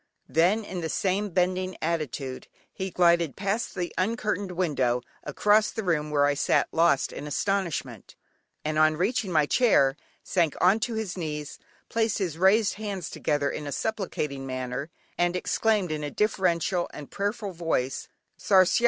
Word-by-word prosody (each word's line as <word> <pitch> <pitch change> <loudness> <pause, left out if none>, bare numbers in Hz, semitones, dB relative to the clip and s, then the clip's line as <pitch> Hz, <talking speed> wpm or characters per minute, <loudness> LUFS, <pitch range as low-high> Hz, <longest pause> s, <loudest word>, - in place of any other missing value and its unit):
Then 185 +7 +3
in 185 -3 -5
the 160 - -3
same 195 +5 0
bending 185 0 0
attitude, 150 -5 -3 0.3
he 190 0 -4
glided 170 -4 +3
past 205 +4 -2
the 180 -2 -3
uncurtained 205 -2 -1
window, 135 -9 +1 0.2
across 210 +8 +3
the 220 - -4
room 155 -5 0
where 145 -1 +3
I 145 - +3
sat 145 - +2
lost 165 -4 +2
in 145 - -6
astonishment, 190 0 -2 0.5
and 155 0 0
on 155 0 +4
reaching 200 +2 0
my 155 -3 +4
chair, 145 - +4 0.3
sank 170 -5 +1
on 190 +5 +4
to 230 +1 -2
his 205 -4 -3
knees, 150 -3 -5 0.3
placed 225 -2 0
his 170 -5 -3
raised 200 +3 +4
hands 195 -5 -4
together 145 -1 0
in 150 - -5
a - - -4
supplicating 155 -10 -3
manner, 130 +3 -4 0.3
and 175 0 +2
exclaimed 205 0 +1
in 155 -1 -3
a 145 - -2
deferential 180 -2 0
and 145 -2 -10
prayerful 205 +1 -2
voice 160 -7 -2 0.3
"Sarsiar."! 190 0 +4
175 Hz, 155 wpm, -27 LUFS, 150-200 Hz, 0.5 s, on